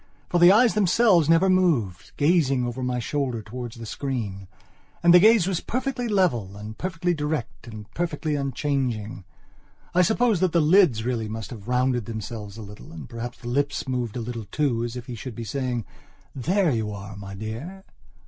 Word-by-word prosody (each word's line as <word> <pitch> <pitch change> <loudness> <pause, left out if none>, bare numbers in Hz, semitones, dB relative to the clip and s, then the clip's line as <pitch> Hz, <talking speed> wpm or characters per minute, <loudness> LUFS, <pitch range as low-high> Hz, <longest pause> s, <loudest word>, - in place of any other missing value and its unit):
For 175 - +2
the 175 +1 +8
eyes 230 +3 +5
themselves 195 -4 +4
never 165 +3 +5
moved, 155 - +1
gazing 145 -5 +3
over 120 +2 -4
my 125 -1 -1
shoulder 120 0 -2
towards 120 +1 -7
the 115 -1 -8
screen. 110 -7 -4 0.6
And 170 0 +7
the 180 - +9
gaze 215 -1 +6
was 190 -2 0
perfectly 255 0 -2
level 125 - +1
and 105 +1 -8
perfectly 175 +1 -1
direct 150 -6 -4
and 110 -2 -8
perfectly 160 0 -2
unchanging. 130 -7 -2 0.7
I 180 - +4
suppose 220 +2 +2
that 185 -2 +1
the 170 - +4
lids 155 - +4
really 115 -3 -2
must 110 +2 -6
have 110 -3 -9
rounded 125 -2 +1
themselves 110 -2 -6
a 110 - -7
little 105 0 -12
and 80 -2 -9
perhaps 120 +1 -6
the 120 - -10
lips 140 +3 -1
moved 125 -3 -2
a - - -3
little 115 -1 -5
too, 120 -1 0
as 120 0 -4
if 125 -1 -6
he 125 - -7
should 120 0 -7
be 115 - -5
saying: 125 -1 -2 0.5
"There 175 +6 +1
you 110 -3 -1
are, 100 0 -8
my 100 -1 -8
dear." 120 - -7
125 Hz, 185 wpm, -25 LUFS, 110-170 Hz, 0.7 s, the